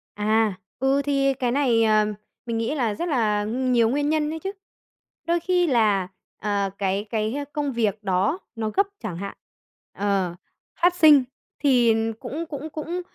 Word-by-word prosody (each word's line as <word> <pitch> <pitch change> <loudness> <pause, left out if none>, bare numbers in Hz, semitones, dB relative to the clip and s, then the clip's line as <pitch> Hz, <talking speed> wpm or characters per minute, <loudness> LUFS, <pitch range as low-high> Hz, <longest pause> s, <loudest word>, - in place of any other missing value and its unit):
À, 215 0 +2 0.3
ừ, 270 +2 +2
thì 275 -1 +2
cái 250 -2 -1
này, 245 -4 +3
ờm, 215 -1 +3 0.3
mình 230 -1 -2
nghĩ 230 +6 -1
là 235 -7 0
rất 345 +10 -3
là 215 -7 +1
nh 255 +4 -1
nhiều 230 -2 +4
nguyên 290 +3 0
nhân 305 -1 +1
ấy 320 - -5
chứ. 385 +4 -4 0.8
Đôi 340 +1 +2
khi 355 0 +1
là, 215 - +2 0.3
ờ, 200 -1 0
cái 195 +1 -1
cái 220 +1 -1 0.2
công 290 -2 -1
việc 220 -3 -1
đó 195 - +1 0.2
nó 220 -1 -2
gấp 395 - +2 0.2
chẳng 190 -6 -4
hạn, 200 +2 -6 0.6
ờ, 195 -3 -1 0.5
phát 350 +1 +4
sinh, 305 -5 +7 0.4
thì 245 -5 +4 0.3
cũng 320 +4 -5
cũng 295 +1 -6
cũng, 325 +4 -4
240 Hz, 170 wpm, -24 LUFS, 210-290 Hz, 0.8 s, sinh